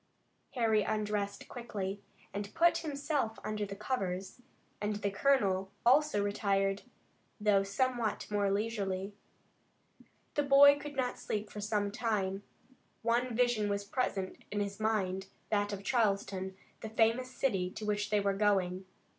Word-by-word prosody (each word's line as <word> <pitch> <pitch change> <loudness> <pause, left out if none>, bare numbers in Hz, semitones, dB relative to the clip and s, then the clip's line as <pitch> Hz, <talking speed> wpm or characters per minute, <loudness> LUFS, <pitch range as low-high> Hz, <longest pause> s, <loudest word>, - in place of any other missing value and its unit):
Harry 225 -3 +3
undressed 210 -1 -2
quickly, 205 -5 -5 0.3
and 200 +1 -5
put 340 0 +4
himself 285 -6 -2
under 215 -1 -2
the 200 - -6
covers, 195 -2 -3 0.4
and 210 0 0
the 205 -1 -1
colonel 195 -5 +2
also 265 -4 +4
retired, 195 -1 +1 0.6
although 210 -2 +4
somewhat 235 +3 0
more 205 -1 +2
leisurely. 200 -2 -1 1.2
The 295 - +2
boy 285 0 +7
could 295 0 -7
not 255 -2 -1
sleep 210 0 -3
for 210 - -6
some 205 -1 0
time. 200 -4 -1 0.6
One 240 +1 +1
vision 240 -4 +2
was 200 0 -1
present 200 -3 -2
in 205 - -2
his 200 0 -3
mind, 195 -3 0 0.2
that 205 -1 +1
of 200 -1 -5
Charleston, 195 -4 0 0.2
the 220 - -6
famous 230 +3 +2
city 195 -10 0
to 210 +3 -7
which 210 0 0
they 210 0 +3
were 200 0 +1
going. 195 -2 +1
210 Hz, 140 wpm, -32 LUFS, 195-235 Hz, 1.2 s, boy